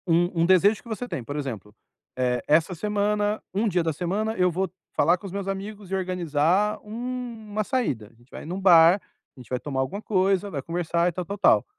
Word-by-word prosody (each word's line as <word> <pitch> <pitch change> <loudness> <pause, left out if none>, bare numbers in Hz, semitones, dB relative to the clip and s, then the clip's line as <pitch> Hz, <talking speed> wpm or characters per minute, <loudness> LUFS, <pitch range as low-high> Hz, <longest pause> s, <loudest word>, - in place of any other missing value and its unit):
Um 170 0 +2
um - - +4
desejo 190 +4 +4
que - - -17
você 230 +3 -4
tem, 130 - -4
por 145 +5 -6
exemplo, 115 -8 -5 0.4
"eh, 125 -1 +1
essa 160 +4 +3
semana, 210 +3 0
um 210 +4 +1
dia 180 -4 +1
da 160 -1 0
semana, 200 +7 -2
eu 180 -2 +3
vou 190 +3 -1 0.3
falar 170 +4 +4
com 200 - -13
os 195 - -6
meus 200 0 -4
amigos 195 0 -5
e - - +1
organizar 180 +2 +1
uma 225 -2 -4
saída, 205 - -1
a - - -26
gente 120 +2 -25
vai - - -8
em 165 - -7
um 185 - -3
bar, 175 0 +6 0.3
a - - -16
gente 125 - -13
vai 125 - -1
tomar 135 -1 -4
alguma 190 +10 -3
coisa, 195 -1 +1
vai 145 -7 -4
conversar 170 +2 0
e - - -4
tal, 180 +1 -5
tal, 200 +4 -5
tal". 200 - +4
185 Hz, 225 wpm, -25 LUFS, 160-205 Hz, 0.4 s, bar